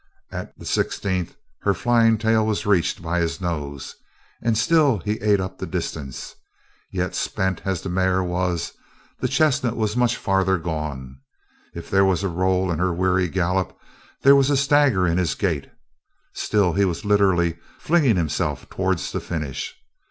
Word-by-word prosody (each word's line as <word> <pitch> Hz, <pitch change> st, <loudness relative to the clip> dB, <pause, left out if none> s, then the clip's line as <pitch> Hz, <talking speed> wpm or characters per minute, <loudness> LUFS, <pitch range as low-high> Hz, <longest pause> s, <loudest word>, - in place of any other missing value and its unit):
At -, -, -7 dB
the -, -, -12 dB
sixteenth 95 Hz, -4 st, -1 dB, 0.2 s
her 100 Hz, -1 st, +1 dB
flying 115 Hz, -2 st, +3 dB
tail 110 Hz, 0 st, +2 dB
was 110 Hz, -1 st, -1 dB
reached 90 Hz, -4 st, +1 dB
by 85 Hz, +1 st, -1 dB
his 85 Hz, +2 st, -1 dB
nose 75 Hz, -6 st, -4 dB, 0.4 s
And 115 Hz, -1 st, +1 dB
still 145 Hz, 0 st, +3 dB
he 105 Hz, +4 st, -2 dB
ate 105 Hz, -1 st, +3 dB
up 95 Hz, 0 st, -5 dB
the -, -, -4 dB
distance. 65 Hz, -3 st, -5 dB, 0.6 s
Yet 90 Hz, -1 st, -2 dB
spent 95 Hz, -2 st, -1 dB
as 95 Hz, -3 st, -2 dB
the -, -, -4 dB
mare 95 Hz, +1 st, +1 dB
was, 90 Hz, -1 st, -1 dB, 0.5 s
the -, -, 0 dB
chestnut 130 Hz, -6 st, +1 dB
was 110 Hz, -1 st, -1 dB
much 125 Hz, -1 st, +2 dB
farther 95 Hz, -1 st, +1 dB
gone. 75 Hz, -6 st, -5 dB, 0.6 s
If 85 Hz, -, -7 dB
there 95 Hz, 0 st, +5 dB
was 95 Hz, -1 st, +2 dB
a 100 Hz, -, 0 dB
roll 95 Hz, +1 st, +1 dB
in 80 Hz, -, -2 dB
her 90 Hz, 0 st, +1 dB
weary 90 Hz, +1 st, +1 dB
gallop, 90 Hz, +1 st, -1 dB, 0.5 s
there 140 Hz, +1 st, +8 dB
was 140 Hz, 0 st, +4 dB
a 145 Hz, -, +3 dB
stagger 140 Hz, -, +3 dB
in 85 Hz, +1 st, +1 dB
his 85 Hz, -6 st, 0 dB
gait; 80 Hz, -9 st, -2 dB, 0.6 s
still 100 Hz, -5 st, +1 dB
he 100 Hz, -, +2 dB
was 90 Hz, 0 st, -1 dB
literally 90 Hz, -5 st, +2 dB, 0.2 s
flinging 150 Hz, -9 st, +3 dB
himself 80 Hz, -5 st, -1 dB
towards -, -, -1 dB
the -, -, -2 dB
finish. 75 Hz, -5 st, -5 dB
95 Hz, 165 wpm, -23 LUFS, 85-110 Hz, 0.6 s, there